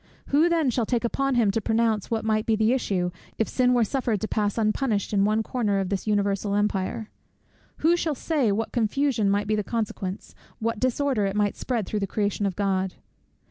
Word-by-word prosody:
Who 305 +5 +4
then 325 -6 +2
shall 230 -2 -1
take 240 -2 0
upon 275 +3 0
him 225 -4 +3
to 225 - -1
pronounce 225 -2 +1
what 225 -1 -1
might 215 -1 +1
be 225 - +3
the 220 +2 +3
issue, 185 -8 0 0.3
if 220 - +1
sin 250 -1 +2
were 245 -2 +4
suffered 230 -2 -1
to 220 - -1
pass 210 -1 -1
unpunished 215 -1 0
in 200 -1 +3
one 215 +1 +1
corner 215 -4 0
of 190 -2 -2
this 200 +1 -3
universal 200 -1 +1
empire? 205 +1 -1 0.7
Who 340 +2 +6
shall 320 -3 -1
say 275 -5 +1
what 220 +2 -1
confusion 235 -1 +1
might 205 +1 +1
be 215 +1 +1
the 210 - -1
consequence, 200 -4 -4 0.2
what 230 0 -2
disorder 255 -3 +1
it 195 - -3
might 205 -1 +1
spread 235 -5 -2
through 210 - -2
the 200 - -2
creation 205 0 -1
of 190 - -3
God? 190 -2 0
215 Hz, 205 wpm, -25 LUFS, 205-245 Hz, 0.7 s, Who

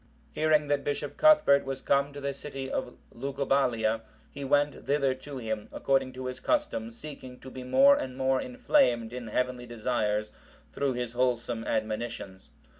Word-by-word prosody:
Hearing 155 -1 +2
that 145 -1 +1
Bishop 145 0 -3
Cuthbert 300 - +6
was 135 0 -5
come 140 +1 +2
to 145 - -8
the 140 0 -2
city 135 -1 -6
of 125 - -3 0.2
Lugubalia,(758) 125 -4 0 0.3
he 140 - -7
went 145 +1 +1
thither 140 -2 +2
to 135 +2 -9
him, 110 -3 -4
according 135 -1 +1
to 130 0 -7
his 130 0 -4
custom, 285 - 0
seeking 130 0 -10
to 130 - -11
be 130 - -7
more 275 - +6
and 130 - -4
more 130 0 +2
inflamed 250 - +2
in 125 -2 -6
heavenly 125 +2 -2
desires 110 -3 -1 0.4
through 140 -2 0
his 120 -1 -3
wholesome 120 -2 0
admonitions. 110 -3 -3
130 Hz, 160 wpm, -29 LUFS, 120-140 Hz, 0.4 s, Cuthbert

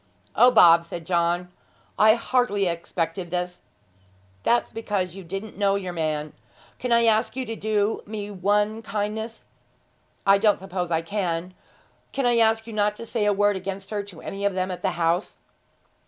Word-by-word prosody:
'O, 245 +3 +7
Bob,' 170 -8 +7
said 170 0 -8
John; 175 +1 0 0.5
'I 215 +1 +7
hardly 235 -4 +1
expected 170 0 -3
this!' 180 0 -3 0.8
'That's 240 - +1
because 200 -5 -2
you 195 - -8
didn't 195 +4 -7
know 200 -1 +3
your 185 -3 -3
man. 155 -2 -2 0.5
Can 250 - -3
I 235 0 +5
ask 220 +1 +2
you 260 -1 -3
to 225 - -5
do 215 0 0
me 210 -1 -5
one 205 +3 +1
kindness? 220 +1 -4 0.8
I 195 0 +6
don't 210 -1 +4
suppose 185 -2 -4
I 165 -1 0
can. 180 -1 -2 0.6
Can 275 -1 -1
I 240 -1 +3
ask 225 0 +3
you 230 - -8
not 210 0 +1
to 230 - -8
say 225 -2 -1
a 210 - +4
word 205 0 +2
against 195 +1 -6
her 210 -1 -1
to 200 -5 -12
any 195 +1 -6
of 200 -2 +1
them 185 0 -1
at 180 - -7
home?' 175 -2 +1
200 Hz, 170 wpm, -24 LUFS, 180-220 Hz, 0.8 s, O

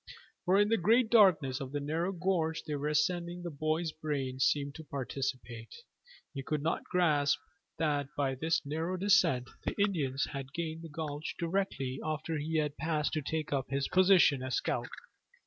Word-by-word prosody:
For 185 +1 +4
in 205 0 +4
the 225 -1 +2
great 225 +5 +4
darkness 165 - +5
of 135 -1 -5
the 145 - -1
narrow 160 +6 -1
gorge 175 -3 -1
they 155 - -4
were 145 0 -2
ascending 175 +3 0
the 175 - -4
boy's 155 +3 -1
brain 140 -5 -3
seemed 140 +2 +1
to 160 - -9
participate. 130 -4 -5 0.6
He 135 - -4
could 150 +1 -2
not 165 - -1
grasp 150 -6 +2 0.4
that 145 -3 0
by 135 -2 +1
this 160 +4 0
narrow 160 +5 -2
descent 180 -10 +3 0.2
the - - -3
Indians 150 -10 +1
had 135 -1 -6
gained 165 -1 -3
the 165 - -9
gulch 150 -1 -5
directly 165 -7 -2
after 155 0 -2
he 160 +2 -1
had 150 -2 -1
passed 155 0 -1
to 155 - 0
take 155 +1 -3
up 135 -2 -1
his 140 0 0
position 185 -7 +5
as 130 -1 -2
scout. - - -1
155 Hz, 175 wpm, -31 LUFS, 140-170 Hz, 0.6 s, darkness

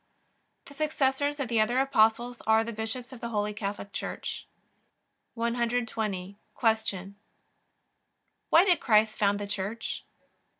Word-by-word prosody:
The 280 - -13
successors 285 -1 0
of 275 - -1
the 230 -1 +2
other 240 +4 +1
Apostles 240 -2 +2
are 220 0 +5
the 230 +1 -5
bishops 225 +4 -4
of 250 - -10
the 235 - -3
Holy 210 -2 -1
Catholic 200 -1 -5
Church. - - -5 0.9
120. 230 -5 -1 0.2
Q. 220 -4 0 1.3
Why 340 +4 +7
did 360 -3 +4
Christ 215 -2 +3
found 205 -1 +3
the 205 - -4
Church? 205 +3 -4
225 Hz, 125 wpm, -28 LUFS, 210-245 Hz, 1.3 s, Why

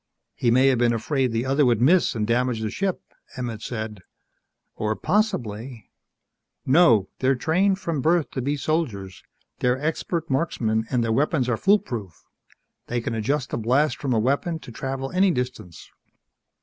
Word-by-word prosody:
"He 120 - 0
may 130 +3 +4
have 130 -3 +2
been 120 -1 +3
afraid 130 +2 0
the 115 +2 -1
other 135 +3 +2
would 120 -4 +3
miss 165 +7 +3
and 110 -2 0
damage 120 0 0
the 110 -1 -2
ship," 195 -2 -2 0.3
Emmett 120 -4 -4
said. 110 -4 -5 0.7
"Or 110 0 -1
possibly 120 - -2 0.4
" - - -56
"No. 115 - +5
They're 130 +1 +2
trained 180 +9 +1
from 165 -7 -3
birth 165 +2 +2
to 130 - -3
be 145 +3 -1
soldiers. 125 - -2 0.4
They're 125 +1 +1
expert 160 +2 -2
marksmen 115 -7 0
and 125 -2 +1
their 115 -1 0
weapons 140 0 +1
are 120 - +1
foolproof. 120 - 0 0.6
They 120 - -1
can 115 - -3
adjust 130 +5 -1
the - - -2
blast 130 +7 +2
from 135 - -3
a - - +2
weapon 140 +8 0
to - - -10
travel 135 +3 -4
any 190 +2 +3
distance." 125 - -4
125 Hz, 165 wpm, -24 LUFS, 115-155 Hz, 0.7 s, No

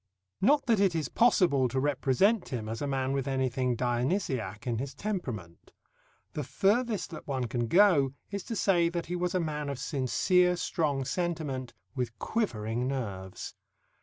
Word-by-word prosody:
Not 275 +8 +4
that 230 -4 +3
it 195 -4 +3
is 160 -2 -1
possible 175 - +4
to 130 +2 -1
represent 145 - +2
him 115 -4 -4
as 110 +1 -4
a 145 - -1
man 135 -1 -1
with 135 -1 -1
anything 130 -2 0
Dionysiac 120 - -1
in 120 -3 -1
his 135 +1 -5
temperament. 125 - -5 0.6
The 150 - -3
furthest 205 - +1
that 155 - -9
one 135 -3 -1
can 120 0 -2
go 165 - +5 0.2
is 200 -2 -3
to 230 - -4
say 175 -5 +3
that 170 0 -3
he 180 - -3
was 180 +1 -1
a - - +3
man 150 -3 -2
of 140 - -3
sincere 165 +7 +2
strong 150 -6 -1
sentiment 145 -8 -3 0.2
with 120 -4 -3
quivering 120 - -1
nerves. 100 -9 -4
140 Hz, 165 wpm, -29 LUFS, 125-180 Hz, 0.6 s, go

